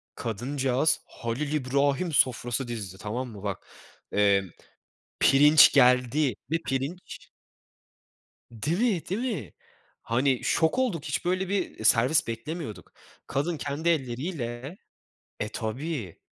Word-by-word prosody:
kadıncağız 130 Hz, +5 st, 0 dB
Halil 135 Hz, +6 st, -4 dB
İbrahim 140 Hz, +4 st, +1 dB
sofrası 125 Hz, -1 st, +1 dB
dizdi, 100 Hz, -6 st, -6 dB
tamam 120 Hz, +6 st, -4 dB
mı? 105 Hz, -3 st, -11 dB
Bak, 100 Hz, -3 st, -5 dB, 0.4 s
emm, 100 Hz, -2 st, +3 dB, 0.7 s
pirinç 145 Hz, +2 st, +7 dB
geldi. 125 Hz, +1 st, +4 dB, 0.2 s
Bir 165 Hz, +1 st, 0 dB
pirinç 140 Hz, +8 st, -5 dB, 1.2 s
Değil 145 Hz, -, -2 dB
mi, 220 Hz, -8 st, +1 dB
değil 195 Hz, +5 st, -1 dB
mi? 120 Hz, -, -8 dB, 0.5 s
Hani, 125 Hz, +2 st, 0 dB
şok 160 Hz, +9 st, +2 dB
olduk, 205 Hz, -, 0 dB
hiç -, -, -3 dB
böyle 185 Hz, +1 st, 0 dB
bir, 195 Hz, -2 st, -1 dB
eee, -, -, -8 dB
servis 125 Hz, +8 st, +4 dB
beklemiyorduk. 115 Hz, +2 st, -6 dB, 0.4 s
Kadın 150 Hz, +5 st, -1 dB
kendi 145 Hz, +4 st, -2 dB
elleriyle 135 Hz, 0 st, -3 dB, 0.6 s
e, 105 Hz, -, -2 dB
tabii, 115 Hz, -, -4 dB
135 Hz, 115 wpm, -27 LUFS, 115-160 Hz, 1.2 s, pirinç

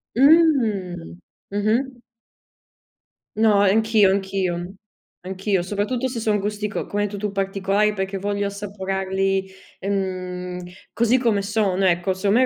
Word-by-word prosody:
Mh. 230 Hz, -, +3 dB, 0.3 s
Mh-mh. 230 Hz, +5 st, 0 dB, 1.3 s
No 220 Hz, -1 st, +4 dB
anch'io, 215 Hz, 0 st, +4 dB
anch'io 190 Hz, -2 st, -2 dB, 0.5 s
anch'io 190 Hz, +1 st, -1 dB
soprattutto 210 Hz, +7 st, -1 dB
se 245 Hz, -2 st, -4 dB
sono 215 Hz, -2 st, +1 dB
gusti 210 Hz, +1 st, -2 dB
co 205 Hz, -, -4 dB
come 205 Hz, 0 st, -1 dB
hai -, -, +1 dB
detto 205 Hz, 0 st, -7 dB
tu, 210 Hz, 0 st, -2 dB
particolari 195 Hz, +1 st, +1 dB
perché 190 Hz, 0 st, -3 dB
voglio 200 Hz, +1 st, -1 dB
assaporarli 195 Hz, -1 st, -2 dB, 0.3 s
mhmm, 185 Hz, -2 st, -3 dB, 0.3 s
così 235 Hz, +2 st, +3 dB
come 225 Hz, -5 st, +2 dB
sono 200 Hz, -2 st, +1 dB
ecco, 175 Hz, +1 st, +2 dB
secondo 200 Hz, +4 st, +1 dB
me 260 Hz, -, +5 dB
200 Hz, 125 wpm, -22 LUFS, 190-215 Hz, 1.3 s, me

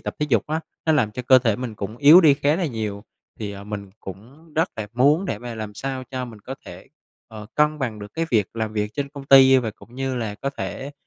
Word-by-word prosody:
tập -, -, -5 dB
thể 150 Hz, -, 0 dB
dục 115 Hz, -5 st, +2 dB
á, 155 Hz, +2 st, -2 dB, 0.3 s
nó 160 Hz, -, +4 dB
làm 110 Hz, -8 st, +2 dB
cho 125 Hz, -, -5 dB
cơ 130 Hz, +1 st, +6 dB
thể 115 Hz, -4 st, +1 dB
mình 125 Hz, -3 st, -5 dB
cũng 105 Hz, +3 st, -6 dB
yếu 150 Hz, +6 st, +8 dB
đi 155 Hz, -5 st, +6 dB
khá 145 Hz, +2 st, +1 dB
là 175 Hz, -2 st, -1 dB
nhiều. 110 Hz, -5 st, -4 dB, 0.4 s
Thì, 105 Hz, -2 st, -3 dB
ờ, 100 Hz, 0 st, -9 dB
mình 100 Hz, -2 st, -6 dB
cũng 130 Hz, -, -12 dB
rất 165 Hz, +3 st, +1 dB
là 110 Hz, -2 st, -4 dB
muốn 145 Hz, +9 st, +3 dB
để 105 Hz, -, -3 dB
mà 120 Hz, 0 st, -7 dB
làm 110 Hz, -2 st, -6 dB
sao 130 Hz, +1 st, -4 dB
cho 130 Hz, -1 st, -3 dB
mình 115 Hz, -4 st, -11 dB
có 130 Hz, +6 st, -7 dB
thể, 90 Hz, +2 st, -11 dB, 0.4 s
ờ, 105 Hz, -2 st, -10 dB
cân 150 Hz, 0 st, +2 dB
bằng 120 Hz, -6 st, -3 dB
được 105 Hz, 0 st, -10 dB
cái 165 Hz, 0 st, -1 dB
việc 105 Hz, -5 st, +3 dB
làm 110 Hz, -1 st, -2 dB
việc 105 Hz, 0 st, -2 dB
trên 140 Hz, -1 st, -3 dB
công 140 Hz, -1 st, -10 dB
ty 135 Hz, -1 st, +7 dB
và 115 Hz, -3 st, -2 dB
cũng 115 Hz, +3 st, -17 dB
như 135 Hz, -1 st, -2 dB
là 110 Hz, -3 st, -3 dB
có 135 Hz, +6 st, -4 dB
thể 140 Hz, 0 st, -6 dB
125 Hz, 260 wpm, -23 LUFS, 105-140 Hz, 0.4 s, yếu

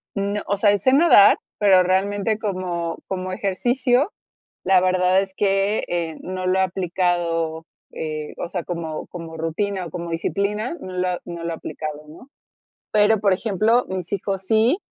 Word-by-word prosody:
No. 200 Hz, +1 st, -1 dB
Osea, 205 Hz, 0 st, +3 dB
y 205 Hz, -, +1 dB
sé 260 Hz, +6 st, +3 dB
nadar, 280 Hz, -10 st, +7 dB, 0.2 s
pero 190 Hz, -3 st, +6 dB
realmente 200 Hz, +3 st, 0 dB
como 180 Hz, -5 st, -3 dB
como 185 Hz, -1 st, -4 dB
ejercicio, 245 Hz, -, +1 dB, 0.5 s
la 190 Hz, -1 st, +4 dB
verdad 185 Hz, +1 st, +3 dB
es 195 Hz, -1 st, -6 dB
que, 195 Hz, +1 st, +1 dB
eh, 170 Hz, -2 st, -2 dB
no 185 Hz, 0 st, -5 dB
lo 190 Hz, +1 st, +2 dB
he -, -, +4 dB
aplicado, 175 Hz, -3 st, -1 dB, 0.3 s
eh, 155 Hz, -1 st, -5 dB
o -, -, -4 dB
sea, 180 Hz, -4 st, -3 dB
como 165 Hz, -3 st, -5 dB
como 165 Hz, -2 st, -8 dB
rutina 185 Hz, +4 st, -2 dB
o -, -, -7 dB
como 170 Hz, -1 st, -5 dB
disciplina, 205 Hz, -, -2 dB
no 185 Hz, -6 st, -8 dB
lo 180 Hz, -1 st, 0 dB
no 170 Hz, -1 st, -7 dB
lo 170 Hz, -, -2 dB
he -, -, -2 dB
aplicado, 155 Hz, -1 st, -6 dB
¿no? 170 Hz, -, -14 dB, 0.6 s
Pero, 210 Hz, 0 st, +4 dB
por 200 Hz, -2 st, +3 dB
ejemplo, 220 Hz, +4 st, +1 dB
mis 185 Hz, -1 st, -5 dB
hijos 195 Hz, 0 st, -2 dB
sí 225 Hz, -, +3 dB
185 Hz, 165 wpm, -22 LUFS, 170-205 Hz, 0.6 s, nadar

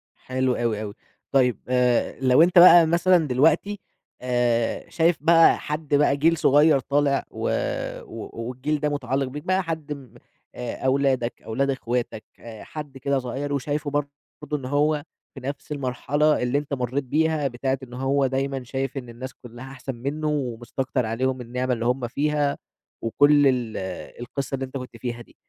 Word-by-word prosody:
حلو 130 Hz, 0 st, -1 dB
أوي، 115 Hz, -3 st, -1 dB
أوي. 105 Hz, -2 st, -5 dB, 0.4 s
طيب، 125 Hz, -5 st, +3 dB
آآ، 125 Hz, -1 st, +1 dB
لو 130 Hz, +2 st, +5 dB
أنت 175 Hz, +1 st, +6 dB
بقى 175 Hz, -1 st, +9 dB
مثلًا 170 Hz, -1 st, +3 dB
دلوقتي، 160 Hz, +10 st, +2 dB, 0.4 s
آآ، 120 Hz, -2 st, 0 dB
شايف 170 Hz, +1 st, +2 dB
بقى 165 Hz, 0 st, +6 dB
حد 150 Hz, -1 st, -2 dB
بقى 145 Hz, -1 st, +3 dB
جيل 165 Hz, +3 st, +3 dB
صغيِّر 145 Hz, +1 st, +5 dB
طالع، 140 Hz, +1 st, +1 dB
و -, -, -3 dB, 0.5 s
و -, -, -8 dB, 0.2 s
والجيل 130 Hz, +5 st, -2 dB
ده، 150 Hz, 0 st, 0 dB
متعلِّق 135 Hz, -1 st, -1 dB
بيك، 145 Hz, +3 st, -7 dB
بقى 185 Hz, +1 st, +1 dB
حد 160 Hz, -3 st, -4 dB
م 135 Hz, -6 st, -12 dB, 0.4 s
آآ، 125 Hz, -1 st, -4 dB
أولادك، 130 Hz, -2 st, +1 dB
أولاد 135 Hz, +5 st, -1 dB
أخواتك، 120 Hz, -4 st, -2 dB, 0.2 s
آآ 115 Hz, -2 st, -10 dB
حد 145 Hz, -3 st, -8 dB
كده 140 Hz, +1 st, 0 dB
صغيِّر، 135 Hz, +3 st, -4 dB
وشايفه 145 Hz, +2 st, -2 dB
برضه 145 Hz, 0 st, -1 dB, 0.5 s
إن 135 Hz, -, -8 dB
هو 145 Hz, +2 st, +1 dB, 0.3 s
في -, -, -9 dB
نَفْس 140 Hz, +3 st, -6 dB
المرحلة 145 Hz, +2 st, +1 dB
اللي 125 Hz, +3 st, +1 dB
أنت 145 Hz, 0 st, -4 dB
مرَّيت 130 Hz, +1 st, -1 dB
بيها، 155 Hz, +2 st, +1 dB
بتاعة 130 Hz, +1 st, -2 dB
إن 125 Hz, -2 st, -11 dB
هو 135 Hz, +2 st, +1 dB
دايمًا 135 Hz, 0 st, -2 dB
شايف 135 Hz, +3 st, -4 dB
إن 125 Hz, -3 st, -6 dB
الناس 125 Hz, +2 st, -8 dB
كلَّها 120 Hz, +2 st, -11 dB
أحسن 135 Hz, 0 st, -6 dB
منُّه، 145 Hz, +6 st, -3 dB
ومستكتر 130 Hz, -2 st, -2 dB
عليهم 130 Hz, +3 st, -1 dB
النعمة 125 Hz, +1 st, -2 dB
اللي 115 Hz, -1 st, -3 dB
هُم 125 Hz, 0 st, 0 dB
فيها، 145 Hz, +2 st, 0 dB, 0.5 s
وكل 145 Hz, +5 st, +4 dB
ال 125 Hz, -4 st, 0 dB, 0.4 s
القصة 135 Hz, +3 st, -4 dB
اللي 135 Hz, 0 st, -3 dB
أنت 130 Hz, +1 st, -6 dB
كنت 125 Hz, -2 st, -9 dB
فيها 120 Hz, +1 st, -5 dB
دي. -, -, -17 dB
135 Hz, 165 wpm, -24 LUFS, 125-145 Hz, 0.5 s, بقى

